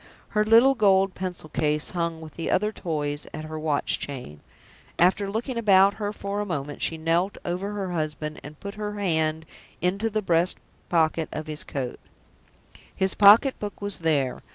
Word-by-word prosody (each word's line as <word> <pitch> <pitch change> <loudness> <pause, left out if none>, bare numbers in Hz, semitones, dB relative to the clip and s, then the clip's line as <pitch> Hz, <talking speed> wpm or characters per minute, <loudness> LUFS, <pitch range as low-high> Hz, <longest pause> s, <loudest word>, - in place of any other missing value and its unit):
Her 210 -1 +2
little 230 +5 +6
gold 195 -5 +3
pencil 180 -3 -5
case 150 0 0
hung 170 -2 -2
with 155 -2 -10
the 165 - -4
other 210 +3 +1
toys 150 -6 -3
at 155 - -6
her 155 0 -6
watch 155 -2 0
chain. 125 - -6 0.6
After 190 +3 +3
looking 235 +4 -3
about 200 -2 +5
her 205 0 -1
for 200 -1 -4
a - - -1
moment, 145 -7 -4
she 165 - 0
knelt 165 +5 0
over 185 +4 -3
her 195 -3 -3
husband 155 -2 -3
and 150 0 -11
put 200 0 -6
her 210 0 -3
hand 160 -4 0 0.3
into 195 +5 0
the 215 0 -2
breast 170 0 +2 0.3
pocket 160 -1 +1
of 155 - -5
his 155 -1 -5
coat. 130 -3 -5 1.0
His 190 0 0
pocket 210 +6 +6
book 205 -1 -6
was 205 -1 +1
there. 145 -6 0
175 Hz, 175 wpm, -25 LUFS, 155-205 Hz, 1.0 s, little